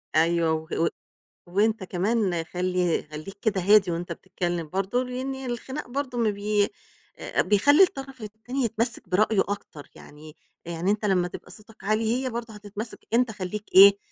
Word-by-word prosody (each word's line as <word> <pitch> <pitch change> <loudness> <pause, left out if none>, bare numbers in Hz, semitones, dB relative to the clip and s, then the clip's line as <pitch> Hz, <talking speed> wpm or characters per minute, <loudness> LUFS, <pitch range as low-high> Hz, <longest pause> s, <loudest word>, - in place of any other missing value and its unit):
أيوه، 165 0 +3
وه 160 0 -3
و 165 - +3 0.6
وأنت 210 +3 +1
كمان 185 -2 0
خلّي 180 -1 0
خلّيك 155 +7 -8
كده 200 -4 +1
هادي 200 -1 +5
وأنت 170 +1 -4
بتتكلّم 175 -3 -3
برضه، 195 +8 0
لإن 255 +2 -4
الخِناق 260 +2 -5
برضه 255 -1 -3
ما 225 -2 +2
بي 205 0 +1 0.5
آآ - - 0
بيخلّي 285 - +5
الطرف 270 -7 -3
التاني 220 +5 -4
يتمسّك 230 -3 -2
برأيه 210 +2 +3
أكتر، 160 -7 -6
يعني 150 +2 -13 0.3
يعني 170 +3 -1
أنت 210 0 -1
لمّا 180 -3 +2
تبقى - - -10
صوتك 220 0 -14
عالي 220 +3 +1
هي 255 - 0
برضه 230 -1 -5
هتتمسّك، 210 +2 -7
أنت 240 -1 +3
خلّيك 200 +1 -5
إيه، 200 +1 +10
205 Hz, 155 wpm, -26 LUFS, 180-230 Hz, 0.6 s, إيه